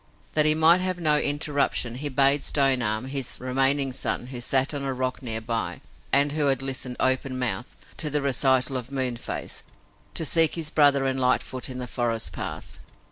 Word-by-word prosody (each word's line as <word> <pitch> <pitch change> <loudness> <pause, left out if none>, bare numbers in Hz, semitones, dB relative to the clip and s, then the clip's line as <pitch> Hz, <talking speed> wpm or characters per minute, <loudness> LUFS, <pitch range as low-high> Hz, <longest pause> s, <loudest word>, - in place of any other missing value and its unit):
That 155 0 +3
he 155 - +4
might 165 +3 +5
have 185 -1 -2
no 150 -3 +3
interruption 145 -5 0
he 145 +4 -5
bade 140 +1 +3
Stone 135 -3 +2
Arm, 110 +1 -1
his 135 -1 -2
remaining 135 +2 +1
son, 125 -1 -2
who 120 - -5
sat 135 +3 +2
on 140 -1 -4
a 135 -1 -2
rock 130 +1 -3
near 115 -3 -4
by, 115 0 -3 0.3
and 140 +1 +4
who 150 -1 0
had 135 -1 +1
listened, 130 -2 -2
open 130 0 0
mouthed, 125 -2 -3 0.2
to 150 - -2
the 145 0 0
recital 130 -1 +2
of 125 +1 -7
Moonface, 130 -3 -3 0.5
to 160 - -1
seek 160 +1 +3
his 160 -2 0
brother 140 -3 +3
and 135 0 -1
Lightfoot 130 0 0
in 130 - -6
the 125 - -4
forest 115 -7 -1
path. - - -7
135 Hz, 190 wpm, -25 LUFS, 125-145 Hz, 0.5 s, might